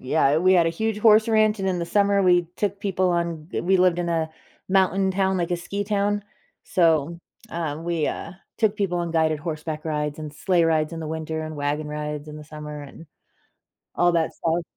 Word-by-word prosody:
Yeah, 135 Hz, +2 st, +2 dB
we 185 Hz, +3 st, +4 dB
had 175 Hz, -3 st, +5 dB
a -, -, +3 dB
huge 215 Hz, +6 st, -2 dB
horse 215 Hz, 0 st, +5 dB
ranch, 215 Hz, -1 st, +3 dB
and 190 Hz, 0 st, -1 dB
in 185 Hz, -1 st, 0 dB
the 170 Hz, -, -3 dB
summer, 200 Hz, +2 st, +3 dB
we 175 Hz, -2 st, +4 dB
took 200 Hz, -1 st, -1 dB
people 190 Hz, -2 st, 0 dB
on 170 Hz, -2 st, -2 dB
g -, -, -2 dB
We 190 Hz, +2 st, +3 dB
lived 180 Hz, -1 st, +3 dB
in 175 Hz, -1 st, -1 dB
a 165 Hz, -1 st, 0 dB, 0.4 s
mountain 190 Hz, 0 st, +2 dB
town, 190 Hz, 0 st, +1 dB
like 170 Hz, -1 st, -1 dB
a 175 Hz, -, +1 dB
ski 195 Hz, +4 st, -4 dB
town, 205 Hz, 0 st, 0 dB, 0.4 s
so, 165 Hz, -2 st, +2 dB, 0.3 s
uh, 160 Hz, -3 st, -3 dB
we, 170 Hz, -2 st, -1 dB
uh, -, -, -4 dB, 0.3 s
took 215 Hz, -2 st, +2 dB
people 190 Hz, -4 st, 0 dB
on 170 Hz, -1 st, -2 dB
guided 160 Hz, -1 st, +2 dB
horseback 155 Hz, 0 st, -5 dB
rides, 150 Hz, -1 st, -2 dB
and 155 Hz, -1 st, -6 dB
sleigh 175 Hz, +1 st, +2 dB
rides 155 Hz, -1 st, +1 dB
in 165 Hz, -, -5 dB
the 160 Hz, -, -5 dB
winter, 160 Hz, 0 st, -4 dB
and 155 Hz, 0 st, -6 dB
wagon 145 Hz, +1 st, -2 dB
rides 150 Hz, 0 st, -5 dB
in 150 Hz, -, -8 dB
the 150 Hz, -, -10 dB
summer, 150 Hz, -1 st, -8 dB
and 145 Hz, +4 st, -12 dB, 0.9 s
all 175 Hz, 0 st, +3 dB
that 165 Hz, -1 st, 0 dB
stuff. 170 Hz, +1 st, -1 dB
170 Hz, 210 wpm, -24 LUFS, 155-190 Hz, 0.9 s, had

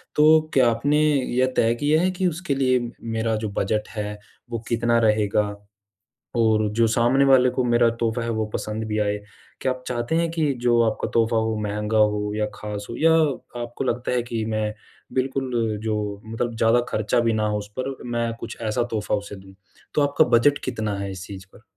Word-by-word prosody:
तो 155 Hz, +1 st, +6 dB
क्या 130 Hz, -3 st, +5 dB
आपने 145 Hz, +6 st, +1 dB, 0.4 s
यह 130 Hz, 0 st, +2 dB
तय 115 Hz, +1 st, +3 dB
किया 150 Hz, +2 st, +3 dB
है 185 Hz, +1 st, +2 dB
कि 185 Hz, 0 st, 0 dB
उसके 170 Hz, -3 st, -2 dB
लिए 130 Hz, -2 st, +2 dB, 0.2 s
मेरा 115 Hz, 0 st, -1 dB
जो -, -, -2 dB
बजट 105 Hz, +2 st, 0 dB
है, 105 Hz, -1 st, -4 dB, 0.3 s
वो 115 Hz, -1 st, -3 dB
कितना 115 Hz, 0 st, +2 dB
रहेगा? 105 Hz, -2 st, +2 dB, 0.9 s
और 110 Hz, -2 st, +3 dB
जो 115 Hz, +1 st, +3 dB
सामने 120 Hz, +5 st, +3 dB
वाले 130 Hz, -2 st, +5 dB
को 130 Hz, -, -1 dB
मेरा 120 Hz, -1 st, +4 dB
तोहफ़ा 115 Hz, 0 st, 0 dB
है -, -, -3 dB
वो 110 Hz, -1 st, -1 dB
पसंद 110 Hz, +1 st, -3 dB
भी 105 Hz, 0 st, -1 dB
आए। 105 Hz, -1 st, 0 dB, 0.4 s
क्या 130 Hz, -, +1 dB
आप 130 Hz, 0 st, -10 dB
चाहते 120 Hz, +4 st, -2 dB
हैं 165 Hz, 0 st, +1 dB
कि 160 Hz, -3 st, 0 dB
जो 120 Hz, -1 st, +4 dB
आपका 110 Hz, -, -4 dB
तोहफ़ा 115 Hz, 0 st, +2 dB
हो, 110 Hz, 0 st, 0 dB
महँगा 105 Hz, +1 st, -1 dB
हो 105 Hz, -1 st, +2 dB
या 105 Hz, 0 st, 0 dB
ख़ास 105 Hz, -1 st, -6 dB
हो? 115 Hz, -, -5 dB
या 165 Hz, +1 st, +4 dB, 0.5 s
आपको 120 Hz, +2 st, -5 dB
लगता 125 Hz, -1 st, -1 dB
है 125 Hz, -1 st, +1 dB
कि 115 Hz, -2 st, -3 dB
मैं 110 Hz, -1 st, -1 dB, 0.4 s
बिल्कुल 130 Hz, 0 st, -1 dB, 0.3 s
जो 105 Hz, -2 st, -2 dB
मतलब 115 Hz, +2 st, -3 dB
ज़्यादा 115 Hz, +2 st, +4 dB
खर्चा 110 Hz, +2 st, +1 dB
भी 115 Hz, -1 st, +2 dB
ना 110 Hz, -1 st, 0 dB
हो 105 Hz, 0 st, -1 dB
उस 105 Hz, 0 st, -7 dB
पर 135 Hz, +1 st, -2 dB, 0.2 s
मैं 115 Hz, -1 st, -1 dB
कुछ 115 Hz, -, -7 dB
ऐसा 110 Hz, +1 st, 0 dB
तोहफ़ा 105 Hz, -2 st, -1 dB
उसे 100 Hz, 0 st, -7 dB
दूँ। 95 Hz, 0 st, -14 dB, 0.4 s
तो 150 Hz, -, +3 dB
आपका 145 Hz, 0 st, +3 dB
बजट 140 Hz, +5 st, +4 dB
कितना 110 Hz, -5 st, -2 dB
है 100 Hz, 0 st, -4 dB
इस 95 Hz, -1 st, -7 dB
चीज़ 95 Hz, -1 st, -9 dB
पर? -, -, -17 dB
115 Hz, 200 wpm, -23 LUFS, 105-130 Hz, 0.9 s, तो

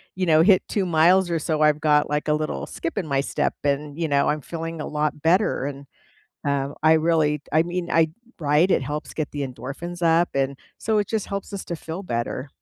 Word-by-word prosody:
you 185 Hz, -, -1 dB
know, 160 Hz, -2 st, +5 dB
hit 190 Hz, -1 st, +5 dB
2 200 Hz, -3 st, 0 dB
miles 175 Hz, +2 st, +4 dB
or 165 Hz, -1 st, 0 dB
so, 155 Hz, 0 st, -1 dB
I've 150 Hz, 0 st, +3 dB
got, 150 Hz, -2 st, +3 dB
like, 150 Hz, +1 st, -1 dB
a -, -, +4 dB
little 150 Hz, -, -2 dB
skip 165 Hz, -, -5 dB
in 195 Hz, -, -1 dB
my 140 Hz, -1 st, +1 dB
step, -, -, -1 dB
and, 145 Hz, +2 st, -1 dB
you 165 Hz, -, 0 dB
know, 140 Hz, -1 st, +2 dB
I'm 150 Hz, 0 st, -1 dB
feeling 165 Hz, +1 st, -6 dB
a -, -, -4 dB
lot 150 Hz, -1 st, -2 dB
better. 170 Hz, -3 st, +2 dB
And, 140 Hz, -1 st, -6 dB, 0.6 s
um, 140 Hz, 0 st, -1 dB
I 160 Hz, +1 st, +6 dB
really 155 Hz, -2 st, +2 dB
I 155 Hz, +1 st, +5 dB
mean, 175 Hz, 0 st, -4 dB
I 160 Hz, -1 st, +3 dB, 0.3 s
Right? 150 Hz, +5 st, +3 dB
It -, -, +3 dB
helps 150 Hz, +3 st, -5 dB
get 155 Hz, -, -3 dB
the 145 Hz, -2 st, -3 dB
endorphins 155 Hz, +7 st, -7 dB
up, 165 Hz, +1 st, +4 dB
and 135 Hz, 0 st, 0 dB, 0.2 s
so 220 Hz, -1 st, +1 dB
it 205 Hz, -, +1 dB
just 220 Hz, -3 st, -2 dB
helps 200 Hz, 0 st, -5 dB
us 195 Hz, -, -5 dB
to 170 Hz, -, -4 dB
feel 165 Hz, +4 st, -6 dB
better. 120 Hz, -1 st, -3 dB
155 Hz, 225 wpm, -23 LUFS, 145-175 Hz, 0.6 s, I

